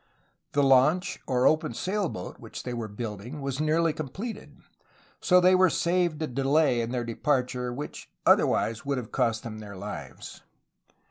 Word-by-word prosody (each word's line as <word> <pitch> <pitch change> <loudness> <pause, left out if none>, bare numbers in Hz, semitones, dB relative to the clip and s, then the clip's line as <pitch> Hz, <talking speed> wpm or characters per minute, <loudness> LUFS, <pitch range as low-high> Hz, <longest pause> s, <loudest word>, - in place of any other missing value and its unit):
The 145 - +3
launch, 140 +8 +3
or 125 -1 +1
open 155 -7 +2
sail 195 - -1
boat, 90 - -7
which - - -8
they 125 - -4
were 115 -2 -4
building 110 +5 -6
was 135 -1 -3
nearly 160 +1 +2
completed; 190 - -7 0.6
so 180 0 +5
they 180 +1 +5
were 185 0 +5
saved 170 -2 +1
a - - +1
delay 135 -1 +2
in 115 - -3
their 125 -1 -2
departure 125 0 -1
which 140 +5 -7 0.2
otherwise 115 0 +3
would 140 -1 -1
have 120 -3 -6
cost 115 -1 0
them 110 -2 -7
their 105 -2 -9
lives. 95 - -8
135 Hz, 160 wpm, -27 LUFS, 120-160 Hz, 0.6 s, so